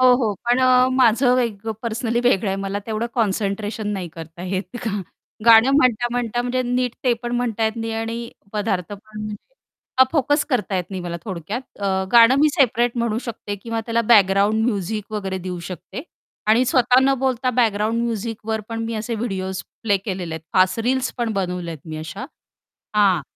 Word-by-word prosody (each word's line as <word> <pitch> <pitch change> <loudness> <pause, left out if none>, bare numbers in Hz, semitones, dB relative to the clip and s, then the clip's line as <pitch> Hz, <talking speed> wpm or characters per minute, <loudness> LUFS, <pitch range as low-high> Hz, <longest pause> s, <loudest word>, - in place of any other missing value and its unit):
हो, 255 -1 +7
हो, 225 -5 0
पण 240 +1 +3
अ, 255 0 +5
माझं 255 0 +4
वेग 225 -4 -2 0.2
पर्सनली 230 +1 -1
वेगळं 210 -4 +3
आहे. 195 - -1
मला 195 +1 -3
तेवढं 225 +1 -2
कॉन्सन्ट्रेशन 210 -1 -1
नाही 185 -3 -4
करता 165 +1 -10
येत, 185 +3 -4 0.7
गाणं 230 +2 +7
म्हणता-म्हणता 240 -2 +1
म्हणजे 255 +1 -1
नीट 250 0 -1
ते 250 - +4
पण 240 0 -3
म्हणता 230 -2 -1
येत 220 - +1
नाही 225 0 -3
आणि 230 +1 -3 0.2
पदार्थ 205 -3 -2
पण 215 +1 -10
म्हणजे 210 0 -5 0.6
हा 260 - +9
फोकस 290 0 +2
करता 210 -7 0
येत 180 - -1
नाही, 190 - -4
मला 170 -1 -4
थोडक्यात. 190 +2 -4 0.2
अ, 190 -1 0
गाणं 235 +2 +8
मी 305 - +6
सेपरेट 240 -2 +2
म्हणू 230 -2 0
शकते 210 -2 -5
किंवा 230 +3 -4
त्याला 230 0 +1
बॅकग्राऊंड 205 +2 +4
म्युझिक 210 0 -2
वगैरे 195 -3 -3
देऊ 180 - -4
शकते. 185 - -7 0.4
आणि 225 +4 +4
स्वतः 250 0 +4
न 270 0 +4
बोलता 255 -1 0
बॅकग्राऊंड 220 +1 +1
म्युझिकवर 225 -1 -3
पण 225 0 -3
मी 230 - -3
असे 225 +2 -3
व्हिडिओस 190 -4 -3 0.2
प्ले 205 -3 +3
केलेले 185 -4 -4
आहेत. 160 - -7
फास्ट 185 +2 +3
रील्स 255 +2 0
पण 235 -2 0
बनवल्यात 180 -4 -3
मी 155 -1 -6
अशा. 155 +10 -6 0.7
हां, 200 -3 +4
225 Hz, 175 wpm, -21 LUFS, 195-240 Hz, 0.7 s, हा